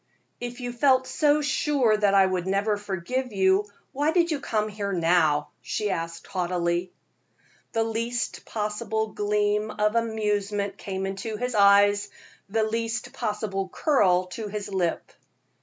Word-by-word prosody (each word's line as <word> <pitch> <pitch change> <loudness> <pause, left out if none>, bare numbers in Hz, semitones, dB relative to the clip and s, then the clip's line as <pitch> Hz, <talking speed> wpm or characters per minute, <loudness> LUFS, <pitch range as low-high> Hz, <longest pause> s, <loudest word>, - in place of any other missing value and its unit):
"If 245 +1 -6
you 245 0 -3
felt 260 +1 +3
so 295 +2 +2
sure 275 -5 +2
that 205 -2 +2
I 195 -1 +6
could 185 -1 -2
never 200 +2 +1
forgive 205 +6 -3
you, 190 +1 +3 0.2
why 290 +3 +1
do 350 +1 +4
you 330 -4 -1
come 215 -6 -1
here 205 -1 -4
now?" 165 -4 +2
she 210 -2 -2
asked, 165 -1 -4
haughtily. 175 -1 -1 0.8
The 225 - +2
least 230 +1 -2
possible 220 0 -2
gleam 210 +1 0
of 210 0 0
amusement 210 -3 -1
came 190 -1 -4
into 195 +3 -4
his 250 +2 -2
eyes, 205 0 +5 0.4
the 220 +2 +1
least 230 +3 -2
possible 210 -5 -3
curl 185 - +2
to 220 -2 -5
his 205 0 -5
lip. 175 -3 -1
210 Hz, 140 wpm, -26 LUFS, 195-230 Hz, 0.8 s, I